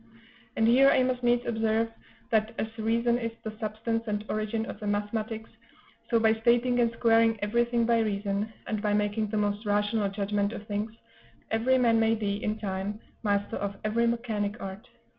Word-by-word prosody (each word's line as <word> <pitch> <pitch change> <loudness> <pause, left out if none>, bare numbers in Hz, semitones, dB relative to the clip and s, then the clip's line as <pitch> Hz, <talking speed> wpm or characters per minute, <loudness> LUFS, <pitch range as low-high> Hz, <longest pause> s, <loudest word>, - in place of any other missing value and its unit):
And 225 - +3
here 265 +4 +6
I 260 -2 +4
must 255 -1 0
needs 240 0 +2
observe 225 0 +1 0.4
that, 220 0 +1
as 220 0 -3
reason 235 +2 +1
is 230 -1 -2
the 220 -1 -5
substance 225 +1 -2
and 210 0 -2
origin 215 +1 -1
of - - -7
the 210 - -5
mathematics, 215 +2 -2 0.6
so 230 - +3
by 220 0 +4
stating 240 +2 +2
and 235 -1 +3
squaring 225 -1 +3
everything 235 +2 +1
by 230 0 +3
reason, 205 0 -1
and 215 -2 -2
by 205 -1 +1
making 210 +1 0
the 215 +1 -2
most 205 0 0
rational 205 0 +1
judgment 200 +1 -1
of 215 - -7
things, 210 +1 -3 0.6
every 240 +4 +3
man 230 -3 +4
may 225 0 +3
be, 205 -1 -2
in 215 0 -1
time, 200 0 -3 0.2
master 205 -2 0
of 200 0 -3
every 230 +2 +1
mechanic 225 -3 -1
art. 195 +2 -7
220 Hz, 180 wpm, -28 LUFS, 205-230 Hz, 0.6 s, here